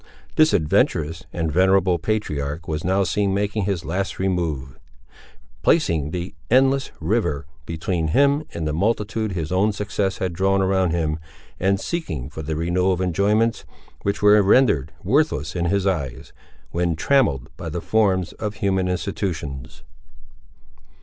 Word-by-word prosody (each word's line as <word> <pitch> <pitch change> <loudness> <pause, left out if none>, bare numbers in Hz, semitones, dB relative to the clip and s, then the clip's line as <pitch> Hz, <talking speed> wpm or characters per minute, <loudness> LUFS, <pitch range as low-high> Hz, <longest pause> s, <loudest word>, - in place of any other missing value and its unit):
This 155 0 +5
adventurous 80 -2 +1
and 80 -2 -2
venerable 95 0 +3
patriarch 80 -7 -2
was 80 0 -3
now 95 +2 +2
seen 95 +2 0
making 105 0 -1
his 95 -4 -2
last 95 +4 -2
remove; 85 -9 -2 0.8
placing 80 - +2
the 90 +3 -5 0.2
"endless 135 +2 +3
river" 80 - 0 0.2
between 80 0 -2
him 140 - +3
and 80 -2 -4
the 75 - -1
multitude 105 +3 -1
his 80 -3 -3
own 100 +4 +3
success 100 -1 -2
had 95 -2 -2
drawn 95 +3 +2
around 95 -1 +2
him, 80 -2 -1 0.4
and 95 +1 +2
seeking 80 - -4
for 80 - -6
the 80 +1 -3
renewal 90 +4 +1
of 90 - -3
enjoyments 105 +5 +1 0.4
which 100 +1 -2
were 105 0 +7
rendered 100 - +3
worthless 145 - +1
in 85 -1 0
his 100 +2 +1
eyes, 70 -8 -2 0.4
when 85 -1 0
trammelled 80 - +1
by 85 - -6
the 85 +3 -3
forms 95 -3 +1
of 105 -1 -4
human 95 -2 0
institutions. 80 - -4
95 Hz, 145 wpm, -22 LUFS, 80-100 Hz, 0.8 s, were